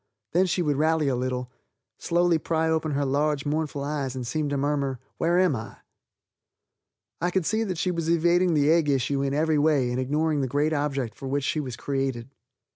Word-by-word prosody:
Then 185 +3 +3
she 180 0 0
would 145 -3 0
rally 155 0 +2
a 130 - 0
little, 125 0 -3 0.5
slowly 175 -1 +2
pry 160 +1 0
open 160 -1 0
her 140 0 0
large, 145 +1 0
mournful 150 -1 -2
eyes, 140 -3 -3
and 125 -1 -4
seem 150 +4 -1
to 140 - -1
murmur 140 -1 -1 0.2
"Where 170 +1 +2
am 180 -6 +3
I?" 110 -2 -7 1.4
I 175 - +1
could 180 -1 0
see 220 +4 +1
that 185 -5 -3
she 180 +2 0
was 165 -2 -2
evading 170 +1 +3
the 145 +1 +3
egg 165 -3 +3
issue 135 0 +1
in 140 0 -1
every 155 0 +2
way 145 -5 +2
and 125 - -1
ignoring 150 +3 0
the 135 - 0
great 145 +4 0
object 140 -6 -1
for 135 +3 -8
which 140 +1 -1
she 155 - 0
was 130 -5 -4
created. 135 -2 -3
150 Hz, 200 wpm, -26 LUFS, 135-160 Hz, 1.4 s, Then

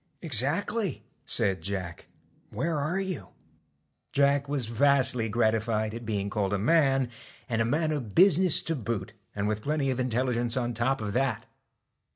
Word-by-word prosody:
' - - -45
Exactly,' 165 - -1 0.2
said 95 -3 +2
Jack, 90 -2 -4 0.2
' - - -36
Where 165 -2 0
are 155 +7 -1
you? 190 -2 -4 0.4
* - - -48
Jack 140 0 +2
was 140 -4 -1
vastly 125 -1 +2
gratified 110 -1 +1
at 115 -1 -7
being 100 -2 -1
called 100 -2 -1
a - - +2
man, 135 +2 +3 0.4
and 115 -3 0
a - - +2
man 155 +6 +1
of 125 -9 -4
business 185 -2 +5
to 165 - -2
boot, 110 -4 -4 0.2
and 100 0 -1
with 105 0 -1
plenty 140 0 0
of 130 - -3
intelligence 125 -1 0
on 120 -1 -1
top 120 +3 0
of 105 -1 -3
that. 125 -3 0
125 Hz, 170 wpm, -28 LUFS, 110-145 Hz, 0.4 s, business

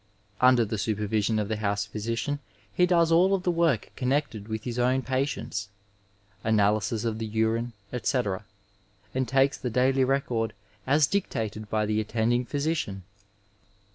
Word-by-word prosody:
Under 125 -2 +5
the 110 0 -3
supervision 105 +1 0
of 105 -1 0
the 110 0 -2
house 100 -1 -1
physician 115 +7 -3 0.3
he 180 - +3
does 170 -2 +3
all 185 +4 +5
of 185 - -4
the 180 - +2
work 165 -9 +1
connected 130 -5 -1
with 110 -1 -4
his 120 -1 -3
own 130 +2 +2
patients; 130 -3 -2 0.7
analysis 105 0 +2
of 110 -1 -1
the 110 - -3
urine, 110 +2 0 0.2
etc., 120 -5 -1 0.7
and 130 -1 0
takes 135 +3 +2
the 125 - -2
daily 130 +3 +3
record 125 -4 0 0.3
as 145 +2 +5
dictated 110 - -2
by 110 -1 +1
the 105 0 0
attending 120 +3 0
physician. 140 - -2
115 Hz, 145 wpm, -27 LUFS, 110-135 Hz, 0.7 s, Under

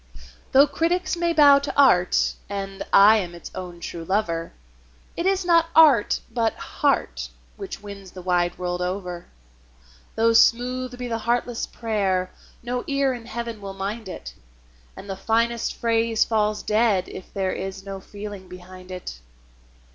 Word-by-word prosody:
Though 275 +2 +7
critics 340 +6 0
may 340 0 0
bow 290 -3 +7
to 280 - -4
art, 180 -10 +4 0.2
and 195 -1 -5
I 210 +3 +7
am 175 -4 -4
its 170 - -10
own 180 -2 -7
true 170 -1 -6
lover, 170 -3 -1 0.6
It 340 - -1
is 385 -1 +1
not 335 -1 +4
art, 290 -10 +5
but 225 -1 0
heart, - - -1 0.3
which - - -8
wins 200 -2 -9
the 185 0 -11
wide 175 -1 +1
world 180 0 -3
over. 180 -1 -4 0.9
Though 230 +1 +3
smooth 250 +2 +2
be 250 0 -5
the 230 -1 -2
heartless 235 +1 -1
prayer, 195 -5 -1 0.3
no 245 +1 -3
ear 275 -2 +1
in 235 -2 -9
Heaven 230 -2 -5
will 195 -1 -7
mind 200 +2 -5
it, - - -8 0.6
And 200 - -10
the 195 - -4
finest 230 +3 0
phrase 230 -1 +1
falls 215 -1 0
dead 210 -4 +2
if 185 - -10
there 190 -1 -1
is 195 0 -6
no 195 -1 -6
feeling 205 -1 -9
behind 185 0 -12
it. 180 - -7
210 Hz, 155 wpm, -23 LUFS, 185-240 Hz, 0.9 s, Though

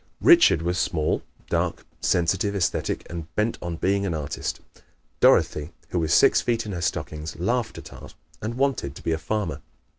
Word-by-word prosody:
Richard 340 - +6
was 90 +1 0
small, 80 -5 0 0.3
dark, - - -1
sensitive, 95 +4 +1
esthetic 95 -3 -1
and 85 -2 -6
bent 110 +2 0
on 85 -1 -4
being 100 +4 +1
an 90 -5 -1
artist. 75 -2 -4 0.6
Dorothy, 75 +2 +3 0.2
who 90 - -1
was 80 -2 -1
six - - +5
feet 115 -2 0
in 105 - -5
her 85 -3 -4
stockings, 80 -1 -3
laughed 115 +6 -1
at - - -10
art - - -12 0.3
and 110 +2 -3
wanted 135 - 0
to - - -11
be - - -1
a 80 - 0
farmer. 100 0 -2
90 Hz, 175 wpm, -25 LUFS, 80-105 Hz, 0.6 s, Richard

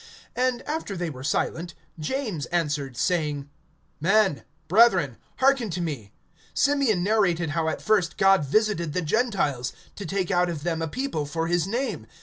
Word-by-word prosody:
(13)And 250 -1 0
after 295 - -3
they 170 -2 -2
were 130 -2 -9
silent, 165 +3 -1 0.2
James 210 - -3
answered, 150 -7 -1
saying: 150 -5 0 0.5
Men, 195 -1 +3 0.3
brethren, 185 - +4 0.2
hearken 265 -4 +3
to 175 0 -3
me. 140 -12 -4 0.4
(14)Simeon 275 -10 +2
narrated 180 -6 +2
how 160 +1 0
at - - -4
first 200 -6 +2
God 195 -3 +5
visited 170 0 +1
the 180 - -1
Gentiles, 155 - 0 0.2
to 200 - -6
take 190 0 -1
out 180 -1 +2
of 155 -4 -5
them 165 -1 -1
a 165 - -1
people 160 - -3
for 165 +2 -2
his 175 +1 +1
name. 225 - -2
175 Hz, 155 wpm, -25 LUFS, 155-215 Hz, 0.5 s, God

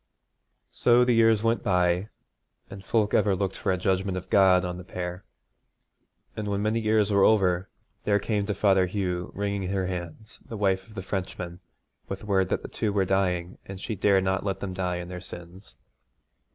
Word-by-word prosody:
So 120 0 +4
the 125 - +3
years 115 -2 +4
went, 115 -2 +1
and 90 0 +2 0.8
folk 105 0 +1
ever 100 -3 +3
looked 95 0 -2
for - - -1
a 95 - +1
judgment 95 +1 0
of 90 - -8
God 95 -2 +5
on 90 0 -4
the - - -8
pair. 90 +1 -6 1.1
And 105 -1 -4
when 100 0 -1
many 110 +2 +1
years 110 -2 +2
were 100 -1 +4
over, 95 -4 +3 0.3
there 100 -1 +3
came 100 0 -1
to 105 - -1
Father 95 -2 +3
Hugh, 90 -2 -3
wringing 100 -2 -2
her 95 -1 -1
hands, 90 +3 -6
the 115 - -8
wife 95 -2 0
of 110 - -16
the 95 - -5
Frenchman, 90 -2 -5 0.5
with 95 +1 -6
word 95 -3 +1
that - - -1
the - - -5
two 105 - -2
were 100 -1 +1
dying, 90 -2 0
and 95 -1 -7
she 110 - -4
dared 100 -1 +3
not 95 0 0
let 100 -1 -2
them 95 -2 -4
die 90 -1 -2
in 90 0 -6
their 90 0 -7
sins. 90 -4 -11
95 Hz, 190 wpm, -26 LUFS, 90-105 Hz, 1.1 s, God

